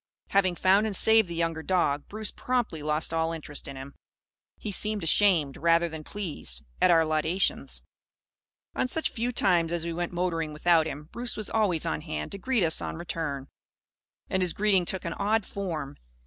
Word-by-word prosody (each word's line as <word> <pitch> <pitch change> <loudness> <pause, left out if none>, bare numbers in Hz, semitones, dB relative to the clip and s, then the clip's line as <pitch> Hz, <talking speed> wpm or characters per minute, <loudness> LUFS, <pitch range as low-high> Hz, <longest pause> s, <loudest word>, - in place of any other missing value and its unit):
Having 190 -2 +2
found 195 +5 +3
and 205 - -2
saved 220 -1 +5
the 170 - -5
younger 165 -1 -1
dog, 160 -5 0
Bruce 215 0 -3
promptly 245 -11 -2
lost 150 +2 -1
all 165 0 +1
interest 150 -3 -6
in 140 - -7
him. 135 +1 -9 0.6
He 210 - -5
seemed 210 0 +1
ashamed, 165 -5 +3
rather 170 +1 +3
than 160 -1 -7
pleased, 155 - -2 0.2
at - - +5
our 165 -2 +5
laudations. 155 +5 0 0.9
On - - 0
such 320 +5 0
few 235 +2 -2
times 175 -8 +2
as 170 -1 -1
we 170 - -3
went 175 +1 -3
motoring 165 -3 -1
without 160 +1 +3
him, 150 +1 -7
Bruce 240 0 -2
was 215 -2 -3
always 200 -8 +1
on 80 0 -2
hand 75 0 -5
to 200 - -6
greet 250 -2 +1
us 160 -1 +2
on - - -4
our - - -8
return. 155 -5 -4 0.8
And 190 - 0
his 180 -2 +1
greeting 195 -3 +2
took 190 +1 -2
an 170 - -2
odd 215 +1 0
form. 165 -8 -5
170 Hz, 190 wpm, -27 LUFS, 160-200 Hz, 0.9 s, saved